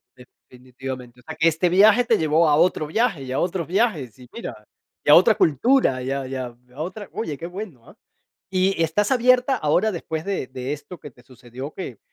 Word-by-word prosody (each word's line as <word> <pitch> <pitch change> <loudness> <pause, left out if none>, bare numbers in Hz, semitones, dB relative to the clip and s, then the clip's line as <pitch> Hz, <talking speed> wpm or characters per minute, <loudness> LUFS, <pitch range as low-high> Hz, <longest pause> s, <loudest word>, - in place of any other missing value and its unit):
Definitivamente, 125 0 -11
o - - -31
sea, 160 +4 -8
que 160 +1 +2
este 165 +2 +2
viaje 210 +6 +5
te 225 -2 +2
llevó 160 +1 +2
a 145 - +4
otro 165 -1 +2
viaje 200 - 0
y 130 - -7
a 130 - -1
otros 175 -1 -1
viajes, 175 - -1
y 125 - -14
mira, 235 - -6 0.5
y - - -2
a - - +9
otra - - +6
cultura 155 - +2
y, 130 - -3
a 135 -1 -3
y, 135 - -6
a 125 -2 -5 0.2
y, - - -25
a 135 - -14
otra 190 +5 -6
oye, 155 -10 -4
qué 165 - -6
bueno, 175 - -9
ah. - - -17 0.5
Y 190 0 +1
y, - - +3
estás 200 +8 0
abierta 255 +1 +3
ahora, 185 +3 +1
después 160 -3 -5
de 195 -9 -3
de 130 +1 -6
esto 150 +3 -10
que 145 - -11
te 125 0 -22
sucedió 125 +2 -10
que, 130 - -7
160 Hz, 225 wpm, -22 LUFS, 130-195 Hz, 0.5 s, a